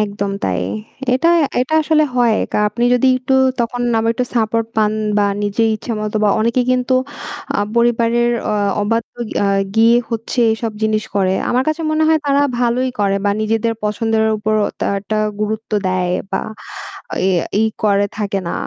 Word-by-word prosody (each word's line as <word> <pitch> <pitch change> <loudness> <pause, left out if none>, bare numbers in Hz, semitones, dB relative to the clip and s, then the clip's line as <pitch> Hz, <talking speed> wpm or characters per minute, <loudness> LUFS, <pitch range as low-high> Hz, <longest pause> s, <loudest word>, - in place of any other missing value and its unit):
একদম 200 -1 -2
তাই। 90 -2 0 0.5
এটা 260 +6 +2 0.3
এটা 255 +5 -1
আসলে 310 0 +3
হয় 240 -3 +3 0.2
কা - - +1
আপনি 235 +4 -2
যদি 250 +2 +2
একটু 255 +1 -3 0.3
তখন 240 +1 -2 0.2
আবার 225 +1 +1
একটু 250 - -1
সাপোর্ট 225 0 +1
পান 215 -1 +2 0.3
বা 205 - +3 0.2
নিজের 205 +2 +1
ইচ্ছামতো 215 -1 -4
বা - - +4
অনেকে 235 +3 +1
কিন্তু 255 0 +1 0.6
আ - - +2 0.2
পরিবারের 235 0 +2 0.2
অ - - 0 0.3
অবাধ্য 225 +3 -1 0.3
আ - - +2 0.3
গিয়ে 230 +1 +5
হচ্ছে 230 +2 -4
এইসব 225 0 -2
জিনিস 215 0 +1
করে। 190 -2 +2 0.2
আমার 250 +1 +2
কাছে 310 +2 -1
মনে 310 0 +1
হয় 320 0 +4
তারা 280 0 +3 0.2
ভালোই 245 +1 +1
করে 200 -1 +1
বা 205 - +3
নিজেদের 225 +1 0
পছন্দের 220 +1 0
উপর 215 +1 -1 0.3
তারা 200 - 0
একটা 215 +2 -3 0.2
গুরুত্ব 215 +1 -3 0.2
দেয় 185 -1 0 0.2
বা - - 0 0.9
এ - - +3 0.3
ইয়ে 220 +1 +2
করে 200 -1 +3
থাকে 200 -2 -2
না। - - -3
225 Hz, 165 wpm, -17 LUFS, 210-240 Hz, 0.9 s, গিয়ে